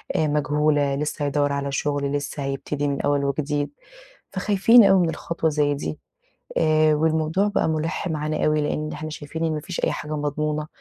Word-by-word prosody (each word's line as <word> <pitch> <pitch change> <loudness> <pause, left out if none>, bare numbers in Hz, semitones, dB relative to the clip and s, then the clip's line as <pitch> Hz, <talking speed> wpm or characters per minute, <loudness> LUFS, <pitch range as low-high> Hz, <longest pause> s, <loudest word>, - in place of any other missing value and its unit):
آآ 155 - +2
مجهولة 145 -1 +1
لسّه 150 0 -2
هيدوّر 145 0 +1
على 140 0 -2
شغل، 145 0 -1
لسّه 145 0 -3
هيبتدي 140 +1 -2
من 140 -1 -1
أوّل 145 -1 +1
وجديد، 145 +1 -1 0.6
فخايفين 205 +5 +5
أوي 190 -3 +5
من 160 - -2
خطوة 165 -1 -1
زي 145 -1 +1
دي، 80 - -5 0.6
آآ 155 -1 +4
والموضوع 160 +5 +1
بقى 205 -5 +1
مُلِحّ 160 +2 -2
معانا 155 0 -1
أوي 150 0 +2
لأن 150 +1 -2
إحنا 155 +1 -6
شايفين 160 +2 -4
إن 160 - 0
ما 150 - -2
فيش 170 +3 -5
أي - - +1
حاجة 150 +1 -4
مضمونة، 150 +1 -2
150 Hz, 180 wpm, -23 LUFS, 145-155 Hz, 0.6 s, فخايفين